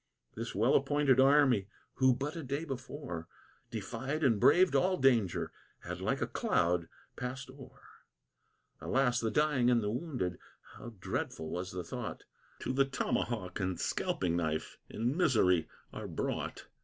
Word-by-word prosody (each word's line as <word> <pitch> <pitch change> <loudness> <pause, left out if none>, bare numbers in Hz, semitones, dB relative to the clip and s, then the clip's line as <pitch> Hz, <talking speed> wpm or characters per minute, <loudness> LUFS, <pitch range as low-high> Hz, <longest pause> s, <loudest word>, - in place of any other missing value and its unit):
This 115 -2 -5
well 115 +6 +3
appointed 140 -1 +3
army, 135 -7 +5 0.3
who 130 -1 +5
but 145 +5 -3
a 165 - -4
day 140 +3 -3
before 130 - -6 0.4
Defied 150 +4 -3
and 115 -7 +4
braved 180 - +5
all 185 0 +3
danger, 120 -9 +2 0.3
had - - -6
like - - 0
a - - +1
cloud 85 -1 +1 0.3
passed 130 +1 -5
o'er. 135 -1 -14 1.0
Alas, 130 -2 +2
the 115 - 0
dying 145 -3 +2
and 120 -3 +3
wounded, 110 - -2 0.4
how 120 -1 -9
dreadful 80 -3 -3
was 90 +1 -3
the 90 -1 -4
thought! - - -6 0.4
To - - -2
the 135 +1 +4
tomahawk 115 -7 -2
and 95 -2 -2
scalping 85 -2 0
knife 80 -2 -2
in 120 +5 -1
misery 95 - +3 0.2
are - - -5
brought. - - -3
125 Hz, 145 wpm, -32 LUFS, 95-140 Hz, 1.0 s, army